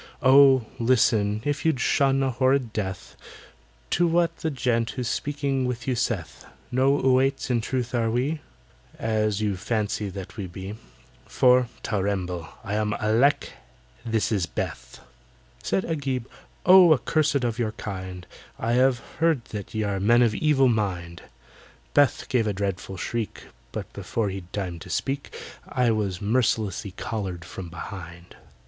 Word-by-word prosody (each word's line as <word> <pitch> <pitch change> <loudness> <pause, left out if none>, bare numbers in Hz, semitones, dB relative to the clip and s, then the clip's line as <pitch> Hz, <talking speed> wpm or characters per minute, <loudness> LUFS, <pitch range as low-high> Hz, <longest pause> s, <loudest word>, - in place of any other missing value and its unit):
"Oh, 135 -2 +7
listen, 110 -3 +2
if 145 -1 -1
you'd 160 -5 +2
shun 135 +1 +2
a 135 - +1
horrid 130 -1 +1
death, 95 -3 -4 0.8
To 175 +1 +3
what 170 0 +2
the 160 - -2
gent 125 -4 0
who's 125 -3 -3
speaking 140 -2 -1
to 120 +1 -3
you - - 0
saith: 115 -7 -2 0.3
No 135 +3 +3
'Oüaits' 130 0 +2
in 120 -2 +2
truth 125 +1 -2
are 115 -2 +1
we, 135 +7 -1 0.6
As 110 -2 0
you 105 -2 0
fancy 105 0 -2
that 95 +2 -8
we 100 -3 -4
be, 95 +3 -7 0.5
For 125 -1 +4 0.2
(ter 105 -3 -1
remble!) 90 -4 -2
I 100 - -4
am 105 0 0
ALECK—this 110 - -1
is 95 -6 +1
BETH!" - - -5 0.6
Said 190 - 0
AGIB, 135 -6 -2 0.4
"Oh! 180 -2 +8
accursed 150 0 +1
of 120 -1 -1
your 110 -2 -1
kind, 95 -3 -6 0.3
I 115 - -1
have 130 +1 +4 0.2
heard 160 -7 +2
that 105 0 -7
ye 110 - 0
are 100 -2 -1
men 120 +5 +5
of 115 -3 +2
evil 135 +1 +3
mind!" 90 -7 -1 0.7
BETH 145 -2 +3
gave 115 -4 +1
a 105 - 0
dreadful 95 -1 -3
shriek— 115 +4 -4 0.3
But - - -6
before 110 -3 -2
he'd 95 -2 -7
time 90 -4 -4
to - - -11
speak 140 +1 -3 0.3
I 125 -2 +2
was 100 -5 -1
mercilessly 110 -3 0
collared 95 -7 -4
from 90 0 -8
behind. 85 0 -9
115 Hz, 150 wpm, -25 LUFS, 100-130 Hz, 0.8 s, Oh